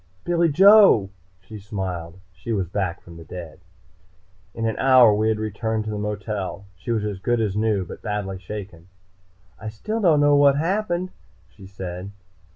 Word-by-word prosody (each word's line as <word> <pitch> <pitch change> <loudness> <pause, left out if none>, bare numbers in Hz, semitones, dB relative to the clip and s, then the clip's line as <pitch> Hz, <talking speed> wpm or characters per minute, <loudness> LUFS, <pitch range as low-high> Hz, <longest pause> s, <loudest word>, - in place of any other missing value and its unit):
"Billy 170 -1 +1
Joe!" 190 - +6 0.3
she 105 +3 -11
smiled. 95 -4 -6
She 90 +6 -7
was 95 -5 -1
back 95 -1 -3
from 85 -1 -13
the 85 - -11
dead. 85 -2 -9 1.0
In 115 - -3
an 110 - -1
hour 130 -4 +6
we 110 +1 +1
had 110 - 0
returned 110 +1 -3
to 110 - -5
the 105 - -4
motel. 105 -2 -4
She 90 - -11
was 110 -3 0
as 100 -3 -4
good 120 +4 0
as 105 -4 -1
new, 105 -3 0
but - - -10
badly 100 -2 -4
shaken. 95 -3 -9 0.7
"I 110 - -6
still 215 - -4
don't 165 -6 +4
know 145 0 +4
what 140 -1 +5
happened," 185 +2 -1 0.4
she 95 -2 -14
said. 95 -1 -7
105 Hz, 170 wpm, -23 LUFS, 95-125 Hz, 1.0 s, Joe